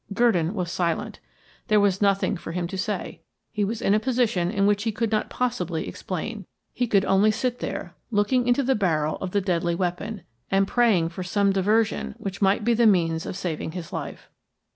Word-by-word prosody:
Gurdon 195 Hz, -6 st, +2 dB
was 180 Hz, -3 st, -2 dB
silent; 170 Hz, -2 st, -2 dB, 0.5 s
there 215 Hz, -1 st, +4 dB
was 200 Hz, -1 st, +2 dB
nothing 200 Hz, 0 st, +2 dB
for 165 Hz, -2 st, -7 dB
him 175 Hz, 0 st, -1 dB
to 190 Hz, -, -5 dB
say. 185 Hz, -, -3 dB, 0.3 s
He 210 Hz, -2 st, -1 dB
was 215 Hz, +3 st, -2 dB
in 195 Hz, -, +3 dB
a 210 Hz, -, +4 dB
position 230 Hz, -8 st, +1 dB
in 195 Hz, +1 st, +1 dB
which 205 Hz, 0 st, +2 dB
he 225 Hz, +1 st, 0 dB
could 225 Hz, +1 st, -2 dB
not 215 Hz, -1 st, 0 dB
possibly 185 Hz, -10 st, -2 dB
explain; 195 Hz, +2 st, -5 dB, 0.3 s
he 245 Hz, -, -1 dB
could 200 Hz, -3 st, +3 dB
only 195 Hz, +3 st, +4 dB
sit 245 Hz, +3 st, -1 dB
there, 175 Hz, -, -5 dB, 0.2 s
looking 240 Hz, +3 st, +1 dB
into 245 Hz, +3 st, +3 dB
the 265 Hz, +1 st, +2 dB
barrel 160 Hz, -8 st, 0 dB
of 190 Hz, -, -4 dB
the 200 Hz, +2 st, 0 dB
deadly 175 Hz, -2 st, 0 dB
weapon, 185 Hz, +4 st, -3 dB, 0.3 s
and 195 Hz, 0 st, +2 dB
praying 210 Hz, -10 st, +3 dB
for 175 Hz, +2 st, -7 dB
some 195 Hz, +2 st, +1 dB
diversion 195 Hz, -, +1 dB
which 195 Hz, +1 st, -6 dB
might 195 Hz, +2 st, +3 dB
be 235 Hz, +2 st, +3 dB
the 230 Hz, 0 st, +4 dB
means 165 Hz, -5 st, +2 dB
of -, -, -4 dB
saving 160 Hz, -2 st, -4 dB
his 175 Hz, -3 st, -7 dB
life. -, -, -6 dB
195 Hz, 200 wpm, -25 LUFS, 180-220 Hz, 0.5 s, there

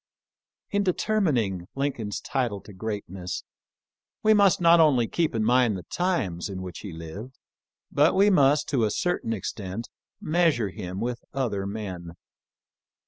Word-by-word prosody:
In 205 Hz, -, +2 dB
determining 155 Hz, -, 0 dB
Lincoln's 130 Hz, -7 st, -2 dB
title 120 Hz, -7 st, -2 dB
to 105 Hz, -, -13 dB
greatness 95 Hz, -3 st, -5 dB, 0.8 s
we 220 Hz, 0 st, +6 dB
must 200 Hz, -3 st, +5 dB
not 170 Hz, -1 st, +6 dB
only 135 Hz, -8 st, +4 dB
keep 165 Hz, -2 st, 0 dB
in 110 Hz, -, +1 dB
mind 120 Hz, -2 st, +3 dB
the 90 Hz, -, -8 dB
times 105 Hz, -, -1 dB
in 95 Hz, -1 st, -5 dB
which 90 Hz, -3 st, -7 dB
he 100 Hz, -, -7 dB
lived, 85 Hz, +11 st, -8 dB, 0.5 s
but 150 Hz, +3 st, +4 dB
we 200 Hz, +2 st, +5 dB
must, 145 Hz, -4 st, +4 dB
to 130 Hz, -5 st, +1 dB
a 110 Hz, -, +2 dB
certain 175 Hz, -3 st, -1 dB
extent, 105 Hz, 0 st, -4 dB, 0.3 s
measure 155 Hz, -, +2 dB
him 95 Hz, -2 st, -6 dB
with 120 Hz, 0 st, -3 dB
other 105 Hz, -8 st, -1 dB
men. 95 Hz, -5 st, -6 dB
115 Hz, 140 wpm, -26 LUFS, 95-155 Hz, 0.8 s, we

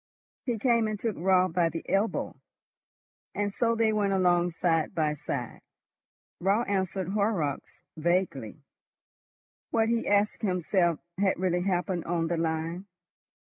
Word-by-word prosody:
He 240 Hz, -2 st, 0 dB
came 235 Hz, -1 st, +2 dB
and 215 Hz, -1 st, -3 dB
took 225 Hz, -3 st, -2 dB
Raut 185 Hz, 0 st, +2 dB
by 170 Hz, -2 st, +3 dB
the 165 Hz, +1 st, -6 dB
elbow, 200 Hz, +3 st, 0 dB, 1.0 s
and 205 Hz, -1 st, -1 dB
so 230 Hz, +1 st, +1 dB
they 225 Hz, -1 st, +2 dB
went 205 Hz, -2 st, +1 dB
along 175 Hz, -2 st, +3 dB
side 165 Hz, 0 st, 0 dB
by 155 Hz, -2 st, +1 dB
side. 135 Hz, -4 st, -5 dB, 0.8 s
Raut 200 Hz, +6 st, +1 dB
answered 190 Hz, -2 st, -1 dB
Horrocks 200 Hz, -8 st, -1 dB
vaguely. 160 Hz, -, -1 dB, 1.1 s
What, 225 Hz, -1 st, +2 dB
he 235 Hz, 0 st, 0 dB
asked 205 Hz, +1 st, +2 dB
himself, 180 Hz, -3 st, +1 dB, 0.2 s
had 195 Hz, -1 st, +2 dB
really 180 Hz, -1 st, 0 dB
happened 180 Hz, -1 st, -1 dB
on 165 Hz, -1 st, -1 dB
the 170 Hz, -, 0 dB
line? 165 Hz, +3 st, -2 dB
185 Hz, 130 wpm, -28 LUFS, 165-205 Hz, 1.1 s, by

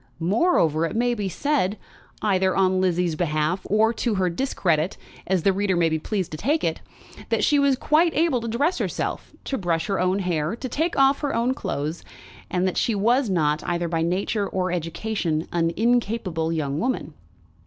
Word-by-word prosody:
Moreover, 170 Hz, -, +2 dB
it -, -, -7 dB
may 240 Hz, +1 st, +2 dB
be 205 Hz, -4 st, -2 dB
said, 215 Hz, -, 0 dB, 0.5 s
either 190 Hz, -3 st, +2 dB
on 185 Hz, -1 st, +2 dB
Lizzie's 180 Hz, -2 st, +1 dB
behalf 155 Hz, +2 st, 0 dB
or 220 Hz, +3 st, +3 dB
to 230 Hz, -1 st, -1 dB
her 185 Hz, -2 st, +1 dB
discredit, 170 Hz, -, 0 dB, 0.3 s
as 185 Hz, -3 st, +1 dB
the 195 Hz, -, +4 dB
reader 195 Hz, -1 st, 0 dB
may 170 Hz, -1 st, +3 dB
be 160 Hz, 0 st, -1 dB
pleased 190 Hz, +1 st, -3 dB
to 155 Hz, -, -5 dB
take 295 Hz, -, 0 dB
it, -, -, -1 dB, 0.5 s
that -, -, +1 dB
she 295 Hz, -2 st, +4 dB
was 280 Hz, -1 st, +3 dB
quite 310 Hz, +5 st, +3 dB
able 315 Hz, -6 st, +2 dB
to 230 Hz, -, -4 dB
dress 280 Hz, +10 st, 0 dB
herself, -, -, -3 dB
to 270 Hz, -, -3 dB
brush 170 Hz, -3 st, 0 dB
her 195 Hz, -2 st, -1 dB
own 185 Hz, +1 st, +2 dB
hair, 175 Hz, -2 st, -1 dB
to 255 Hz, -, -5 dB
take 320 Hz, +7 st, -1 dB
off 275 Hz, 0 st, +4 dB
her 285 Hz, -4 st, -2 dB
own 235 Hz, +3 st, +1 dB
clothes; 155 Hz, -, -4 dB, 0.5 s
and 180 Hz, +1 st, 0 dB
that 185 Hz, -, -2 dB
she 230 Hz, -, +1 dB
was 235 Hz, +4 st, +2 dB
not, 155 Hz, -4 st, +1 dB
either 175 Hz, 0 st, -1 dB
by 165 Hz, -1 st, -1 dB
nature 195 Hz, +4 st, 0 dB
or 185 Hz, -1 st, -1 dB
education, 170 Hz, -1 st, -2 dB
an 165 Hz, -1 st, +1 dB
incapable 215 Hz, -8 st, 0 dB
young 150 Hz, -3 st, -2 dB
woman. 255 Hz, +8 st, -2 dB
190 Hz, 185 wpm, -24 LUFS, 170-235 Hz, 0.5 s, the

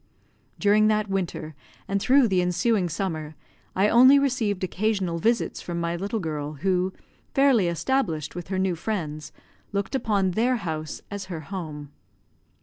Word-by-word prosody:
During 210 Hz, +1 st, +4 dB
that 215 Hz, -1 st, +1 dB
winter 180 Hz, -5 st, -3 dB, 0.3 s
and 200 Hz, 0 st, -1 dB
through 265 Hz, +1 st, +5 dB
the 185 Hz, -3 st, +2 dB
ensuing 180 Hz, +2 st, +1 dB
summer, 160 Hz, -3 st, -3 dB, 0.4 s
I 195 Hz, +2 st, +4 dB
only 255 Hz, +5 st, +7 dB
received 240 Hz, -9 st, 0 dB
occasional 185 Hz, -2 st, -1 dB
visits 230 Hz, +6 st, 0 dB
from 170 Hz, -1 st, -4 dB
my 170 Hz, 0 st, -1 dB
little 200 Hz, +5 st, -2 dB
girl, 150 Hz, -4 st, -4 dB
who, 185 Hz, +4 st, 0 dB, 0.4 s
fairly 270 Hz, -9 st, +4 dB
established 170 Hz, -, -1 dB
with 175 Hz, -1 st, -7 dB
her 190 Hz, 0 st, -2 dB
new 190 Hz, -1 st, +1 dB
friends, 160 Hz, -5 st, -4 dB, 0.4 s
looked 200 Hz, +3 st, -2 dB
upon 210 Hz, -7 st, +1 dB
their 240 Hz, +7 st, +2 dB
house 155 Hz, -8 st, -4 dB
as 205 Hz, -1 st, -5 dB
her 175 Hz, -4 st, -6 dB
home. 155 Hz, -5 st, -7 dB
190 Hz, 145 wpm, -25 LUFS, 170-215 Hz, 0.4 s, only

